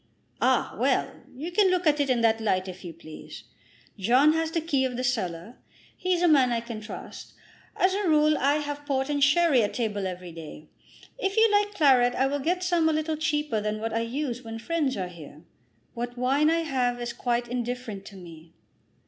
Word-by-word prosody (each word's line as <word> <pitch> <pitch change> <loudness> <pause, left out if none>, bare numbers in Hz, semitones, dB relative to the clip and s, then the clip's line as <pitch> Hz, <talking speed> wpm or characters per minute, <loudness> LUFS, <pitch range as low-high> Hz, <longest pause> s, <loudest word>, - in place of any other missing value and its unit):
"Ah; - - +2
well; - - +1 0.2
you 310 +7 -6
can 390 +1 +4
look 365 -1 0
at 300 -1 +3
it 285 -1 +1
in 245 -2 +2
that 225 -1 +2
light 185 -3 0
if 185 +1 -9
you 175 - -6
please. 155 -5 -11 0.6
John 255 +10 +4
has 320 0 0
the 330 - -1
key 300 -5 0
of 255 -2 -2
the 255 - -2
cellar. 220 -3 -3 0.4
He's 365 -1 0
a - - +5
man 270 -6 +4
I 235 - +1
can 230 -2 -7
trust. 210 - -9 0.4
As 375 +1 +2
a 400 -2 0
rule 305 0 +4
I 280 +1 +2
have 290 -1 -4
port 270 -1 0
and 285 -1 +1
sherry 285 -2 +4
at 205 - -2
table 205 -5 -2
every 180 -1 -7
day. 155 -2 -11 0.5
If 390 -3 -2
you 445 +1 +6
like 410 0 +2
claret 255 -7 +4
I 265 - +2
will 285 +1 -1
get 355 +6 -1
some 345 -3 +2
a - - +1
little 310 +1 -1
cheaper 295 -6 -1
than 210 0 -2
what 225 +1 -3
I 225 - +1
use 245 +1 -3
when 225 -2 -7
friends 285 +1 -1
are 185 -2 -2
here." 155 -3 -12 0.5
"What 240 +1 -5
wine 275 +5 +2
I 330 +1 +2
have 250 -6 -1
is 240 -1 -4
quite 240 -1 -1
indifferent 245 -4 -4
to 200 - -11
me." 165 -3 -13
255 Hz, 210 wpm, -26 LUFS, 220-310 Hz, 0.6 s, you